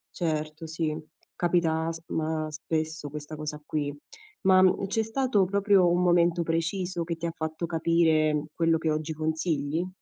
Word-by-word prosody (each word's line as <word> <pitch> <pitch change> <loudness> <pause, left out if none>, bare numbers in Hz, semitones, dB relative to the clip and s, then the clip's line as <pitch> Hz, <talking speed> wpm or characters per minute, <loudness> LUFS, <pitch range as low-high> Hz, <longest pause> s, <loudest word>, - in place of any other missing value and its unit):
Certo, 155 -1 -2
sì. 160 -1 -2 0.4
Capita 165 -2 +1
sp 165 +1 -11
ma 155 0 -1
spesso 155 0 -3
questa 150 +1 -7
cosa 150 0 -5
qui. 145 -2 -2 0.5
Ma, 190 -2 +6
mhmm, 190 +1 +3
c'è 220 +3 0
stato 225 -2 +1
proprio 200 -1 +3
un 175 +1 +2
momento 175 -1 +3
preciso 170 +2 -1
che 170 0 -3
ti 165 +1 -4
ha 165 - -2
fatto 160 +1 -3
capire, 160 -2 +2
mhmm, 150 0 -1
quello 165 -1 +2
che 160 0 0
oggi 155 +1 -2
consigli? 160 +1 -1
165 Hz, 160 wpm, -27 LUFS, 155-175 Hz, 0.5 s, Ma